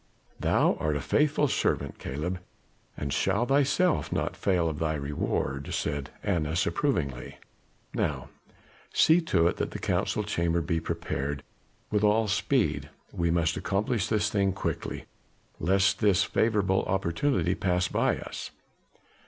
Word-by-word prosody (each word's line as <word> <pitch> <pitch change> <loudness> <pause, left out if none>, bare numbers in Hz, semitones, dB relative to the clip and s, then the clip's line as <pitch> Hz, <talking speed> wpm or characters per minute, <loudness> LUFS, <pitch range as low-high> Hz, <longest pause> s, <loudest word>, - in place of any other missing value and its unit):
"Thou - - +2
art 75 -1 0
a - - 0
faithful 150 - +2
servant, - - -1
Caleb, 80 +7 -3 0.6
and 70 -1 -3
shall 120 - +1
thyself 140 +6 +2
not - - -1
fail 90 -4 +1
of 80 -2 -3
thy 80 -1 0
reward," 70 -1 -2
said 70 0 -2
Annas 85 -3 0
approvingly. 70 - -1 0.6
"Now - - -2 0.6
see 165 +2 +5
to 90 - +2
it 85 - +2
that - - -1
the - - -6
Council - - 0
Chamber 85 0 0
be 80 0 0
prepared 70 -3 -3 0.5
with 105 0 +1
all 105 +1 +3
speed; 95 - +1 0.2
we 85 -1 0
must 80 -1 +1
accomplish 105 +2 0
the 110 - +1
thing 100 -2 +1
quickly, 100 - -4 0.5
lest 95 +4 +2
this 100 -3 +4
favorable 100 -4 +2
opportunity 95 - +1
pass 90 -1 +1
by - - +1
us. - - -7
90 Hz, 135 wpm, -28 LUFS, 80-105 Hz, 0.6 s, see